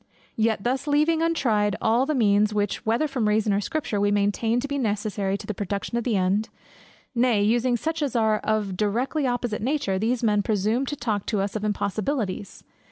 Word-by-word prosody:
Yet 220 -2 +1
thus 260 +4 -1
leaving 305 +3 +2
untried 220 -11 +1
all 235 +4 +2
the 305 - 0
means, 210 -2 +3
which, 205 -1 -1
whether 235 +8 +2
from 255 -6 -1
Reason 210 0 +2
or 200 - +1
Scripture, 280 -6 -2
we 205 - +3
maintain 205 +3 +1
to 275 - -3
be 280 0 -2
necessary 205 -3 -1
to 205 - -10
the 215 - -3
production 200 +3 -4
of 235 - 0
the 230 -5 +1
end, 195 +4 +1 0.6
nay 235 -4 +2
using 240 +3 +2
such 320 +5 -3
as 280 -5 -1
are 220 -2 +2
of 215 -2 0
a - - -4
directly 240 - 0
opposite 245 -4 -2
nature, 235 -7 0
these 235 +3 0
men 210 -2 +3
presume 215 +6 0
to 290 - -2
talk 220 -6 -2
to 210 - 0
us 195 +1 -2
of 215 - -3
impossibilities! 205 +1 -2
220 Hz, 200 wpm, -25 LUFS, 205-250 Hz, 0.6 s, means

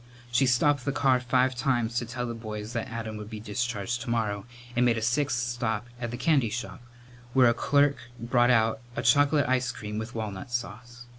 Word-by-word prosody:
She 130 +2 +3
stopped 130 +2 +3
the 140 - 0
car 135 -2 +3
five 125 +1 +2
times 120 -2 0
to 120 - -6
tell 125 +1 -4
the 120 - -4
boys 110 -1 -6
that 115 -2 -2
Adam 110 -1 -5
would 105 0 -8
be 110 -1 -6
discharged 120 +1 -2
tomorrow, 110 -4 -2 0.3
and 120 - +3
made 120 -2 +3
a - - -2
sixth 125 +2 +1
stop 120 -2 -2
at 120 -1 -3
the 120 - -5
candy 140 -7 +2
shop, 120 +4 -5 0.5
where 130 -2 +6
a 115 - +4
clerk 140 +3 +2 0.2
brought 120 +1 +2
out 110 -2 +3 0.2
a 120 - -2
chocolate 145 +4 +4
ice 130 0 +1
cream 105 0 -5
with 110 +2 -6
walnut 105 -2 -5
sauce. 120 0 -5
120 Hz, 200 wpm, -27 LUFS, 110-125 Hz, 0.5 s, where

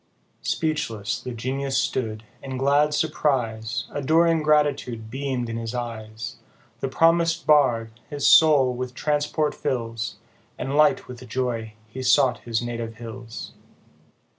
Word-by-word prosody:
Speechless 140 -10 -2
the - - -6
Genius 135 +3 -2
stood, 110 -4 -1 0.2
in 135 -1 -5
glad 145 +3 +3
surprise 125 -7 0
Adoring 160 +3 +3
gratitude 145 -7 +1
beam'd 130 -2 -2
in 115 0 -4
his 115 +1 -4
eyes; 115 0 -5 0.4
The 135 - -2
promis'd 165 +3 +3
Bard, 125 -7 +4 0.2
his 145 -1 -3
soul 145 -5 +6
with 125 0 -5
transport 150 0 0
fills, 115 -2 -3 0.4
And 135 - -3
light 150 0 +4
with 125 -1 -10
joy 115 -3 -2
he 130 +5 -7
sought 130 -2 +4
his 115 0 -2
native 115 -1 -4
hills. 115 0 -8
130 Hz, 125 wpm, -24 LUFS, 115-145 Hz, 0.4 s, soul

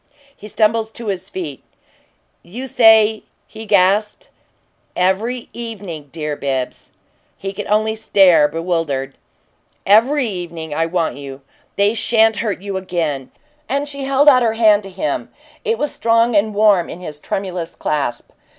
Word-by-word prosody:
He 210 - -11
stumbled 220 +1 0
to 230 -3 -5
his 190 0 -4
feet. 160 -9 -6 0.8
"You 230 +10 -8
say 220 -4 +5
" - - -45
he 220 0 -10
gasped. 210 - +2 0.7
"Every 215 +7 0
evening, 200 -11 -7
dear 150 -2 -4
Bibbs!" 135 -3 -4 0.5
He 195 0 -5
could 205 +1 -6
only 215 +1 +1
stare, 195 -8 +4
bewildered. 160 -5 -2 0.7
"EVERY 245 +7 +4
evening. 170 -5 -6
I 165 +2 0
want 165 -3 -1
you. 140 -1 -9 0.3
They 200 +2 +2
sha'n't 225 -1 +3
hurt 210 -4 -2
you 200 -1 -3
again!" 165 -8 -3 0.4
And 280 +2 -1
she 280 -1 -5
held 275 +2 +2
out 260 -4 +7
her 230 -2 +2
hand 215 -2 +4
to 195 - -10
him; 195 +11 -3 0.3
it 455 0 0
was 295 - -2
strong 230 0 +2
and 205 +1 +2
warm 205 -4 +3
in - - -8
his 155 -5 -8
tremulous 180 -1 -4
clasp. 140 -8 -3
200 Hz, 150 wpm, -18 LUFS, 170-225 Hz, 0.8 s, out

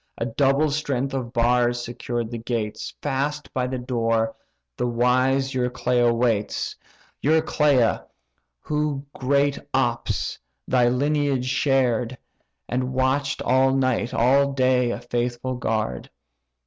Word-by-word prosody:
A 115 - -2
double 135 +5 +2
strength 140 -3 -1
of 125 -3 -3
bars 120 0 +2
secured 120 -1 -4
the 120 - -4
gates; 110 -2 -4
Fast 145 +1 -2
by 125 -1 0
the 130 0 -3
door 115 -2 0 0.4
the 125 - -1
wise 130 +3 +2
Euryclea 125 -1 +1
waits; 115 -3 0 0.5
Euryclea, 150 -5 +2 0.6
who 150 -2 -2
great 140 +2 +1 0.2
Ops! 120 -3 -1 0.3
thy 125 -1 +3
lineage 140 0 +1
shared, 130 -2 +1 0.5
And 125 +1 -1
watch'd 130 +1 0
all 130 +1 +3
night, 130 -2 +1
all 140 +4 +3
day, 130 -2 +2
a 115 -1 -3
faithful 120 +1 -2
guard. 110 - -2
125 Hz, 115 wpm, -24 LUFS, 120-135 Hz, 0.6 s, thy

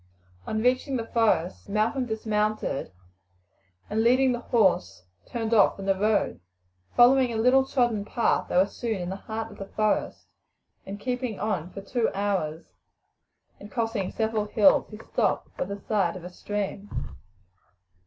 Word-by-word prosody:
On 220 0 -1
reaching 255 +2 +1
the 230 - -3
forest 220 -6 0
Malcolm 225 +5 0
dismounted, 215 - -1 1.0
and 215 +1 0
leading 255 +2 +4
the 240 - -1
horse 185 - +1 0.2
turned 230 -1 -2
off 210 -3 +5
from 195 - -7
the 195 - +3
road. 210 - +1 0.6
Following 250 +1 +6
a 225 - -2
little 250 +4 +5
trodden 240 -6 +1
path 230 +3 0
they - - 0
were 185 - +6
soon 220 +1 -4
in 175 0 -4
the 190 - -3
heart 220 +2 -5
of 205 - -13
the 195 - -6
forest, 215 +1 -1 0.6
and 195 - -5
after 205 - -18
keeping 250 -4 -2
on 190 -6 -2
for 195 - -8
two 230 +4 0
hours, 190 -6 -1 0.9
and 205 - -11
crossing 225 -3 -1
several 220 -1 -1
hills, 210 -1 +4
he 215 - -9
stopped - - -1
by - - -2
the 200 +2 -6
side 195 -4 0
of 180 - -8
a 180 - -8
stream. 205 +1 -4
215 Hz, 160 wpm, -26 LUFS, 195-235 Hz, 1.0 s, Following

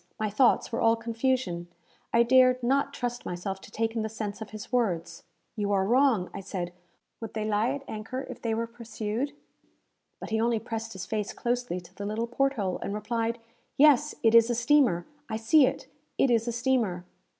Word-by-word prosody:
My 215 -1 -1
thoughts 240 +3 +3
were 230 - -2
all 225 0 +5
confusion. 230 -6 -1 0.4
I 235 - +5
dared 255 +1 +5
not 275 +3 +2
trust 245 -3 -4
myself 190 +2 -4
to - - -12
take 225 +2 -2
in 225 - 0
the 220 - -2
sense 215 -1 -5
of 220 - -6
his 215 -1 -9
words. 170 -9 -1 0.3
"You 205 -2 -1
are 190 -1 +2
wrong," 240 -4 +3
I - - -5
said. 180 -2 -5 0.5
"Would 225 -2 -7
they 215 -1 -1
lie 215 +2 +1
at 280 - -7
anchor 225 +5 -5
if 255 - -9
they 225 -1 -1
were 230 +1 -1
pursued?" 230 +2 -4 0.9
But - - -8
he 220 0 +1
only 235 0 +2
pressed 225 0 -5
his 185 -2 -6
face 210 +1 -3
closely 245 -6 -2
to 175 - -17
the 205 - -5
little 220 +2 -1
port 275 +3 +1
hole, 195 -7 -2
and 200 - -4
replied, 230 +2 -1 0.4
"Yes, 295 0 +5
it 225 -1 +5
is 230 0 +7
a 240 - +1
steamer! 240 -8 +3 0.2
I 220 - -2
see 260 +5 +5
it! - - -3 0.3
It 265 - +3
is 230 0 +2
a - - +1
steamer!" 230 -7 0
225 Hz, 200 wpm, -28 LUFS, 210-245 Hz, 0.9 s, is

